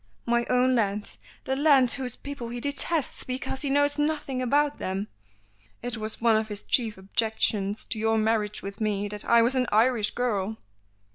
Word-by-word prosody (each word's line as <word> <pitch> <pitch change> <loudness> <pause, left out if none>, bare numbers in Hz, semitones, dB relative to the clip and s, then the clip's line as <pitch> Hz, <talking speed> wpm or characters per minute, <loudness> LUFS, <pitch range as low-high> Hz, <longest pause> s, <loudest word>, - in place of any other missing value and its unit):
My 235 0 +1
own 250 +1 +3
land; 210 -3 -1 0.2
the 265 - -1
land 275 -4 +4
whose 255 -2 -2
people 280 -5 -7
he 240 +1 -5
detests 285 +3 0
because 260 +1 -3
he 285 - -1
knows 285 +1 +2
nothing 295 -4 -1
about 290 +3 +1
them. 195 +3 -3 0.7
It 245 0 -2
was 215 -1 -2
one 230 -1 +4
of 220 0 0
his 210 -1 -4
chief 225 -5 +1
objections 205 0 -1
to 220 - -4
your 225 0 +2
marriage 215 -1 0
with 200 +2 -7
me, 205 -1 0
that 210 0 -4
I 235 0 +5
was 240 +3 +2
an 255 -2 +1
Irish 220 0 +3
girl!" 220 -4 -1
235 Hz, 180 wpm, -26 LUFS, 215-265 Hz, 0.7 s, I